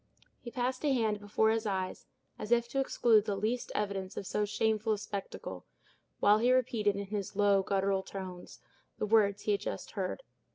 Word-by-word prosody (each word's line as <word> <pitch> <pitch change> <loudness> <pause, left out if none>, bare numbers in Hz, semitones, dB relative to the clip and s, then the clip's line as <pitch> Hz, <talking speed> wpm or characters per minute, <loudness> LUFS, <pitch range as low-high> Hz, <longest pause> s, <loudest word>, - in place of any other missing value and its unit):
He 240 - -7
passed 255 +2 -2
a 295 - +3
hand 220 -5 +1
before 210 +2 +2
his 225 0 0
eyes, 190 -2 -3 0.3
as 215 - -6
if 235 0 +3
to 270 - -1
exclude 230 -5 +3
the 205 -2 -1
least 220 +5 -2
evidence 195 -2 -2
of - - -4
so 210 +2 0
shameful 220 +1 +1
a - - -1
spectacle, 200 -1 -6 0.6
while 210 +1 +5
he 245 +3 +3
repeated, 230 -5 +2
in 200 0 -3
his 200 -1 -4
low, 200 -1 +4
guttural 195 0 +1
tones, 185 -2 -8 0.4
the - - -1
words 205 -2 +3
he 210 - +1
had 200 - +1
just - - -5
heard. 195 - -3
210 Hz, 190 wpm, -31 LUFS, 200-225 Hz, 0.6 s, while